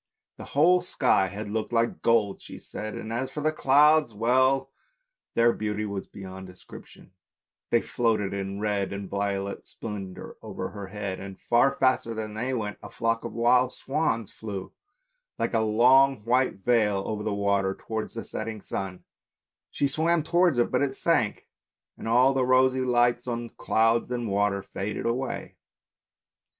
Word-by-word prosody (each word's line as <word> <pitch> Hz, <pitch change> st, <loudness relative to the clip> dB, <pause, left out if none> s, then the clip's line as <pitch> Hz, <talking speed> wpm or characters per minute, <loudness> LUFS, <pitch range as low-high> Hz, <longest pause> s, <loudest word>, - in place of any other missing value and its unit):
The -, -, -8 dB
whole 180 Hz, +4 st, +5 dB
sky 130 Hz, -, +2 dB
had 105 Hz, +3 st, -6 dB
looked 110 Hz, +1 st, -2 dB
like 115 Hz, 0 st, 0 dB
gold, 110 Hz, -4 st, +2 dB
she -, -, -10 dB
said, 110 Hz, -1 st, -7 dB
and 110 Hz, -, -6 dB
as 130 Hz, +3 st, -2 dB
for 150 Hz, +3 st, -5 dB
the 155 Hz, +1 st, +2 dB
clouds! 150 Hz, -3 st, +4 dB
well, 130 Hz, +4 st, +2 dB, 0.6 s
their 115 Hz, 0 st, +4 dB
beauty 105 Hz, 0 st, -2 dB
was 100 Hz, -2 st, -5 dB
beyond 95 Hz, -1 st, -9 dB
description, 90 Hz, -1 st, -14 dB, 0.6 s
they 120 Hz, -, +3 dB
floated 110 Hz, -5 st, 0 dB
in 100 Hz, 0 st, -4 dB
red 105 Hz, -2 st, -1 dB
and 100 Hz, 0 st, -5 dB
violet 100 Hz, 0 st, -3 dB
splendour 100 Hz, -4 st, -7 dB
over -, -, -5 dB
her 100 Hz, -2 st, -8 dB
head, 95 Hz, -1 st, -5 dB
and, 95 Hz, -1 st, -9 dB
far 130 Hz, +4 st, +3 dB
faster 130 Hz, -4 st, +1 dB
than 110 Hz, -1 st, -5 dB
they 120 Hz, +5 st, -2 dB
went, 105 Hz, -5 st, -3 dB
a -, -, -9 dB
flock 115 Hz, 0 st, -1 dB
of -, -, -6 dB
wild 125 Hz, +2 st, +3 dB
swans 135 Hz, -7 st, -1 dB
flew 100 Hz, -4 st, -7 dB, 0.7 s
like -, -, -1 dB
a 115 Hz, -, +3 dB
long 125 Hz, +3 st, +4 dB
white 125 Hz, -5 st, +1 dB
veil 105 Hz, -5 st, +2 dB
over 105 Hz, -1 st, -3 dB
the 110 Hz, 0 st, -2 dB
water 100 Hz, -1 st, +1 dB
towards 110 Hz, 0 st, -5 dB
the 115 Hz, -, -4 dB
setting 110 Hz, 0 st, -5 dB
sun; 95 Hz, -2 st, -5 dB, 0.7 s
she 140 Hz, -, 0 dB
swam 160 Hz, +3 st, +1 dB
towards 175 Hz, -2 st, +3 dB
it, 120 Hz, -, +2 dB
but -, -, +1 dB
it 135 Hz, -1 st, 0 dB
sank 125 Hz, -11 st, 0 dB, 0.5 s
and -, -, -8 dB
all 125 Hz, +4 st, +4 dB
the 135 Hz, -1 st, +1 dB
rosy 130 Hz, +1 st, +4 dB
light 120 Hz, -1 st, +2 dB
on 120 Hz, -1 st, -3 dB
clouds 115 Hz, +2 st, +1 dB
and 120 Hz, -2 st, -2 dB
water 100 Hz, -1 st, +1 dB
faded 100 Hz, +1 st, -5 dB
away. 125 Hz, +3 st, -3 dB
115 Hz, 160 wpm, -26 LUFS, 100-130 Hz, 0.7 s, whole